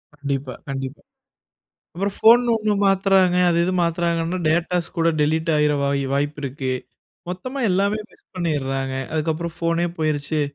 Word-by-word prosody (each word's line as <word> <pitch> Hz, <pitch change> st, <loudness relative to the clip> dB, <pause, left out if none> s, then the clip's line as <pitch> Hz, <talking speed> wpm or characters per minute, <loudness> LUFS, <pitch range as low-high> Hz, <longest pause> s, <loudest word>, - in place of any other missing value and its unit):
கண்டிப்பா, 140 Hz, -2 st, -3 dB, 0.2 s
கண்டிப்பா. 135 Hz, 0 st, -5 dB, 0.9 s
அப்புறம் 195 Hz, +3 st, -2 dB
ஃபோன் 235 Hz, +2 st, +7 dB
ஒண்ணு 215 Hz, -2 st, +1 dB
மாத்துறாங்க 195 Hz, -2 st, +3 dB
அது 170 Hz, -, +1 dB
இது 185 Hz, -, 0 dB
மாத்துறாங்கன்னா 170 Hz, +1 st, 0 dB
டேட்டாஸ் 170 Hz, +1 st, +1 dB
கூட 165 Hz, 0 st, +3 dB
டெலீட் 160 Hz, +2 st, +1 dB
ஆயிற 150 Hz, 0 st, +3 dB
வாய் 140 Hz, 0 st, +1 dB
வாய்ப்பு 145 Hz, +1 st, -1 dB
இருக்கு. 135 Hz, -1 st, -3 dB, 0.6 s
மொத்தமா 255 Hz, +10 st, -5 dB
எல்லாமே 200 Hz, +3 st, +1 dB
மிஸ் -, -, -25 dB
பண்ணிறாங்க. 135 Hz, -6 st, -2 dB, 0.2 s
அதுக்கப்புறம் 160 Hz, +1 st, -2 dB
ஃபோனே 170 Hz, +1 st, 0 dB
போயிருச்சு, 155 Hz, 0 st, 0 dB
165 Hz, 130 wpm, -22 LUFS, 145-180 Hz, 0.9 s, ஃபோன்